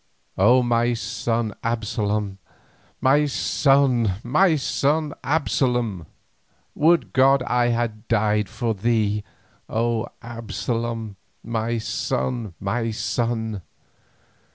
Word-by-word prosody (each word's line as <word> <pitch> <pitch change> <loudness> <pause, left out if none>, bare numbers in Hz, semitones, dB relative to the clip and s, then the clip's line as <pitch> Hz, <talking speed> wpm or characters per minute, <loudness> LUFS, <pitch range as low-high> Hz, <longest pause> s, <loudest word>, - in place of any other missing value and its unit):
"O 125 +1 +5
my 120 0 +2
son 115 -1 -2
Absalom, 105 -3 -1 0.6
my 140 +3 +4
son, 135 - +2
my 160 +7 +3
son 150 +2 0
Absalom! 125 - 0 0.7
would 165 +3 +2
God 135 0 +4
I 125 -1 +1
had 115 -2 -2
died 105 -2 +1
for 115 -3 -1
thee, 105 -1 0 0.5
O 115 0 0 0.2
Absalom, 115 -1 -4 0.3
my 115 +1 -2
son, 115 -1 -2
my 115 +4 -1
son!" 110 -2 -2
115 Hz, 90 wpm, -23 LUFS, 110-125 Hz, 0.7 s, O